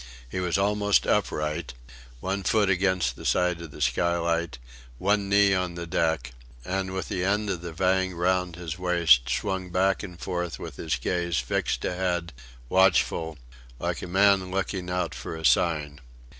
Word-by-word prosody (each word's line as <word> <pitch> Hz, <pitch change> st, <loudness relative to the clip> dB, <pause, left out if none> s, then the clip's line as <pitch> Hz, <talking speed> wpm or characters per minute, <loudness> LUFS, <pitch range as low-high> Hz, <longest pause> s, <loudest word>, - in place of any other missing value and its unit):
He 95 Hz, -, -4 dB
was 90 Hz, 0 st, 0 dB
almost 105 Hz, +1 st, +2 dB
upright 75 Hz, -1 st, -1 dB, 0.5 s
one 95 Hz, +1 st, -2 dB
foot 100 Hz, +1 st, +2 dB
against 90 Hz, -8 st, +1 dB
the -, -, -11 dB
side 90 Hz, -2 st, +1 dB
of 85 Hz, -, -8 dB
the 75 Hz, -, -11 dB
skylight, 85 Hz, +3 st, 0 dB, 0.4 s
one 100 Hz, +4 st, +1 dB
knee 100 Hz, 0 st, +5 dB
on 90 Hz, -2 st, -1 dB
the 85 Hz, 0 st, -5 dB
deck; 80 Hz, -3 st, 0 dB, 0.3 s
and 95 Hz, 0 st, -2 dB
with 95 Hz, 0 st, -4 dB
the 90 Hz, -, -2 dB
end 105 Hz, +2 st, +1 dB
of 90 Hz, -3 st, -3 dB
the 85 Hz, -1 st, -6 dB
vang 95 Hz, +2 st, +1 dB
round 90 Hz, 0 st, 0 dB
his 85 Hz, 0 st, -6 dB
waist 85 Hz, -9 st, +4 dB
swung 95 Hz, +7 st, -2 dB
back 95 Hz, +2 st, +1 dB
and 90 Hz, -4 st, -9 dB
forth 90 Hz, -2 st, -3 dB
with -, -, -8 dB
his 80 Hz, -, -1 dB
gaze 85 Hz, +5 st, -1 dB
fixed -, -, -1 dB
ahead, 90 Hz, -2 st, -1 dB, 0.3 s
watchful, 85 Hz, -2 st, +2 dB, 0.4 s
like -, -, -3 dB
a -, -, -5 dB
man 95 Hz, 0 st, +3 dB
looking 95 Hz, -1 st, -2 dB
out 90 Hz, -3 st, -1 dB
for -, -, -6 dB
a 80 Hz, 0 st, -6 dB
sign. 75 Hz, +1 st, +2 dB
90 Hz, 165 wpm, -26 LUFS, 85-95 Hz, 0.5 s, knee